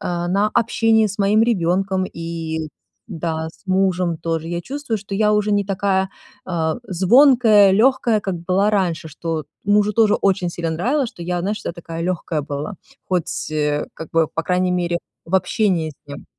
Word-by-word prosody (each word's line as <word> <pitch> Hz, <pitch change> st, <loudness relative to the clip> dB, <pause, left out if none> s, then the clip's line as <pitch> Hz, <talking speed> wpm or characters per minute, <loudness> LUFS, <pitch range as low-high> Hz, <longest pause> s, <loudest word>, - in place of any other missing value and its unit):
а, 175 Hz, 0 st, -2 dB
на 200 Hz, +3 st, +2 dB
общении 225 Hz, -1 st, +2 dB
с 200 Hz, +1 st, -7 dB
моим 205 Hz, +2 st, +3 dB
ребёнком 190 Hz, -2 st, +1 dB
и, 165 Hz, -1 st, -4 dB, 0.4 s
да, 160 Hz, -4 st, -3 dB
с 160 Hz, -, -18 dB
мужем 185 Hz, -3 st, +1 dB
тоже. 165 Hz, 0 st, -3 dB
Я 170 Hz, 0 st, -2 dB
чувствую, 280 Hz, -4 st, -3 dB
что 200 Hz, 0 st, -7 dB
я 210 Hz, +1 st, +3 dB
уже 210 Hz, 0 st, +1 dB
не 205 Hz, 0 st, +2 dB
такая, 190 Hz, -1 st, 0 dB, 0.4 s
а, 160 Hz, -3 st, -1 dB
звонкая, 215 Hz, -, +5 dB
лёгкая, 230 Hz, 0 st, +3 dB
как 195 Hz, -2 st, -3 dB
была 185 Hz, +4 st, +1 dB
раньше. 175 Hz, -6 st, 0 dB
Что 165 Hz, +2 st, -5 dB
вот 155 Hz, -3 st, -3 dB, 0.2 s
мужу 205 Hz, +1 st, +3 dB
тоже 220 Hz, -1 st, +4 dB
очень 185 Hz, -3 st, +1 dB
сильно 170 Hz, -1 st, -3 dB
нравилось, 245 Hz, -, 0 dB
что 170 Hz, -, -11 dB
я, 175 Hz, 0 st, -2 dB
знаешь, 205 Hz, +4 st, -2 dB
вся -, -, -5 dB
такая 165 Hz, -1 st, -6 dB
легкая 160 Hz, -3 st, -3 dB
была, 145 Hz, +7 st, -5 dB, 0.3 s
хоть, 180 Hz, -3 st, 0 dB, 0.3 s
э, 150 Hz, -1 st, 0 dB
как 160 Hz, -, -9 dB
бы, 165 Hz, -2 st, +2 dB
по 165 Hz, -, -1 dB
крайней 180 Hz, +1 st, +1 dB
мере, 175 Hz, -1 st, 0 dB, 0.3 s
в 180 Hz, -, -3 dB
общении 185 Hz, -3 st, +1 dB
с -, -, -15 dB
ним. 140 Hz, -, -8 dB
185 Hz, 180 wpm, -20 LUFS, 165-210 Hz, 0.4 s, звонкая